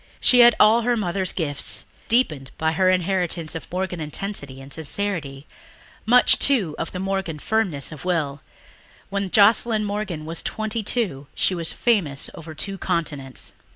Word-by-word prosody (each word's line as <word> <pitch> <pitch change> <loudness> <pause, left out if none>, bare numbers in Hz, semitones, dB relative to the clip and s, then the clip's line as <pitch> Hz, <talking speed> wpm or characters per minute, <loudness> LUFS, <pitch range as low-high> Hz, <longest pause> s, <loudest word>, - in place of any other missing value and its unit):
She 250 - +5
had 240 -1 +8
all 220 +3 +6
her 240 +1 +1
mother's 190 -2 -1
gifts, 145 -5 -3 0.2
deepened 155 - +1
by 160 0 +1
her 185 +3 +2
inheritance 180 -3 0
of 165 - -7
Morgan 185 -1 -3
intensity 150 -3 -4
and 135 +1 -10
sincerity... 155 -4 -4 0.6
much, 250 +2 +6
too, 220 - +2
of 165 - -3
the - - -6
Morgan 190 -4 -2
firmness 175 -6 -1
of 150 -3 -9
will. 155 -6 -1 0.7
When 200 -1 -2
Joscelyn 215 +2 +4
Morgan 200 -6 -4
was 165 +1 -4
twenty 220 +1 -3
two 195 - -1
she - - +2
was 170 -2 0
famous 175 - 0
over 160 -1 -10
two 195 +5 -3
continents. 145 -7 -3
180 Hz, 155 wpm, -23 LUFS, 155-210 Hz, 0.7 s, had